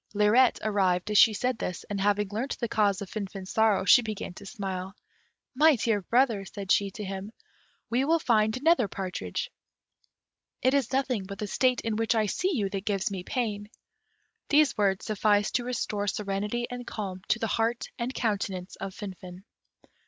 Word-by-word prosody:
Lirette 215 +5 +4
arrived 195 -3 +1
as 210 - +5
she 225 - +8
said 250 +2 -1
this, 180 - -4
and 200 -1 -4
having 205 +1 +2
learnt 235 +7 -3
the 235 - -2
cause 205 -3 +1
of 190 - -10
Finfin's 195 -2 -6
sorrow, 220 -3 +3
she 245 +6 +7
began 215 -5 -5
to 200 +2 -11
smile. 195 -3 -5 0.6
"My 300 +3 +5
dear 220 -3 0
brother," 230 -1 +2
said 195 0 -6
she 200 -1 +3
to 210 +2 -8
him, 195 +1 -5 0.6
"we 245 +3 +1
will 325 +4 +3
find 220 -6 +2
another 295 -4 +3
partridge; 195 - -4 1.1
it 260 - +4
is 275 -5 +1
nothing 260 -6 0
but 200 0 -7
the 210 - -3
state 250 +5 +1
in 225 -2 -2
which 225 +1 +1
I 220 -1 +2
see 365 - -1
you 205 -6 0
that 195 -1 -3
gives 200 -1 0
me 190 -2 -4
pain." 210 -2 -3 0.8
These 300 -1 +4
words 195 -3 +1
sufficed 205 -1 +2
to 245 - -4
restore 210 -4 -2
serenity 205 +4 -2
and 245 0 -6
calm 190 -4 -5
to - - +2
the 225 - -2
heart 230 +2 0
and 240 +2 -2
countenance 200 -6 -2
of 195 -1 -6
Finfin. 185 -2 -9
210 Hz, 180 wpm, -28 LUFS, 195-240 Hz, 1.1 s, she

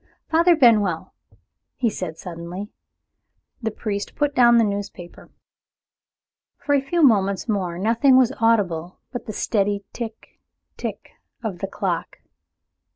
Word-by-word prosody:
"Father 335 +2 +5
Benwell!" 210 - +3 0.6
he 250 - 0
said 180 -7 -4
suddenly. 175 +3 -7 0.9
The 225 - -1
priest 205 -2 -4
put 290 -1 0
down 240 -2 +6
the 230 - +5
newspaper. 200 -4 -5 1.3
For 285 - -1
a 280 - +4
few 325 +5 0
moments 200 -6 +3
more 185 -6 -1
nothing 235 +7 +4
was 260 0 +4
audible 185 -7 +1
but 245 - -6
the - - -3
steady 200 -1 0
tick 225 -2 -8 0.4
tick - - -6 0.3
of 200 -6 -4
the 195 - -3
clock. - - -3
215 Hz, 125 wpm, -22 LUFS, 190-245 Hz, 1.3 s, down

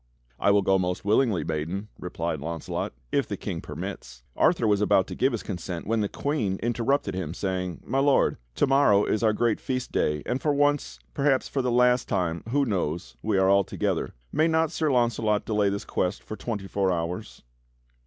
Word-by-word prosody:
"I - - +3
will 100 0 +4
go 95 0 +3
most 90 +1 -2
willingly, 110 -2 +2
maiden," 85 +7 -3
replied 85 -3 -3
Launcelot, 80 +2 -4 0.2
"if - - +1
the - - -4
King - - -4
permits." - - -7
Arthur 115 - +3
was 105 -1 +3
about 95 -2 +4
to - - -7
give 130 - +2
his 115 - -3
consent 90 -3 -5
when 115 +1 +1
the 105 - -1
Queen 125 -10 -1
inter 120 0 -1
rupted 135 -6 +1
him 85 -4 -3
sa^dng: 90 -2 -3
"My 135 +3 0
Lord, 140 0 +3 0.2
to - - +3
morrow 135 -7 +4
is 110 - 0
our 110 -2 +4
great 115 +1 +1
Feast 130 -1 -3
day, 75 -2 0
and 125 +2 -2
for 150 -2 +1
once, 145 0 +1 0.2
perhaps 140 -2 +2
for 135 - -1
the 125 - 0
last 125 0 +3
time, 85 -3 0
who 140 +3 +2
knows, 85 - -2
we 105 -3 0
are 95 0 +4
all 100 0 +5
together. - - -2 0.2
May 160 - +3
not 160 -1 +2
Sir 155 -3 0
Launcelot 115 -4 +1
delay 105 -2 +2
this 100 0 -3
quest 90 +2 -2
for 110 - -6
twenty 110 -4 -4
four 95 -1 0
hours?" 85 0 -4
105 Hz, 200 wpm, -26 LUFS, 90-125 Hz, 0.2 s, all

